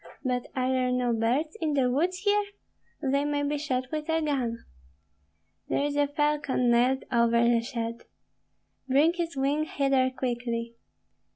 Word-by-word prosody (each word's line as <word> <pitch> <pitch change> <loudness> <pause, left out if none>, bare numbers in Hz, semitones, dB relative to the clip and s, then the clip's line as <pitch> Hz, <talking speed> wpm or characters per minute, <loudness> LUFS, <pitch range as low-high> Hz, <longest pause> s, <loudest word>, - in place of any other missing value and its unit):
But 250 -2 -1
are 255 0 0
there 255 -1 +1
no 250 -1 +1
birds 250 - 0
in 310 -2 0
the 255 -3 +2
woods 355 +7 0
here? 410 0 +3 0.6
They 280 +1 +1
may 290 0 -1
be 290 0 -1
shot 255 -3 -2
with 305 0 -4
a 320 0 +2
gun." 265 -7 -1 1.1
"There - - +1
is 290 0 -2
a 290 0 +2
falcon 295 -4 +1
nailed 250 +3 +3
over 235 -1 +3
the 235 -1 +3
shed." 230 -1 -5 0.8
"Bring 295 +6 +4
his 340 -4 -4
wing 285 +3 +1
hither 275 -3 +1
quickly!" 240 -2 -3
265 Hz, 155 wpm, -27 LUFS, 245-295 Hz, 1.1 s, Bring